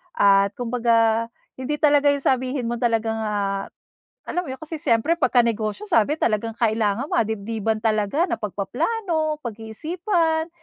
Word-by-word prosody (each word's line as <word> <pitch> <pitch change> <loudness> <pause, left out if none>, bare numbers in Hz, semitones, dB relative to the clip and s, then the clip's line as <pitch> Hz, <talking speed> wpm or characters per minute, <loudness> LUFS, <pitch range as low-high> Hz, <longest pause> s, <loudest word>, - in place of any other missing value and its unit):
At 200 0 +4
kumbaga 230 -2 +1 0.3
hindi 270 +3 -2
talaga 290 -1 +3
yung 280 -1 -4
sabihin 255 0 0
mo 240 0 -3
talagang 225 -2 0
ah, 200 -2 -2 0.6
alam 355 - -2
mo 345 - -9
yun? 260 - -5
Kasi 315 0 -7
siyempre 235 +5 +2
pagka 245 -4 +4
negosyo 225 - -2
sabi 300 - +2
talagang 225 -3 -1
kailangan 220 +1 +1
madibdiban 220 0 -1
talaga 215 - +1
na - - -4
pagpaplano, 310 - -1
pag-iisipan, 320 - -1
230 Hz, 135 wpm, -23 LUFS, 220-300 Hz, 0.6 s, At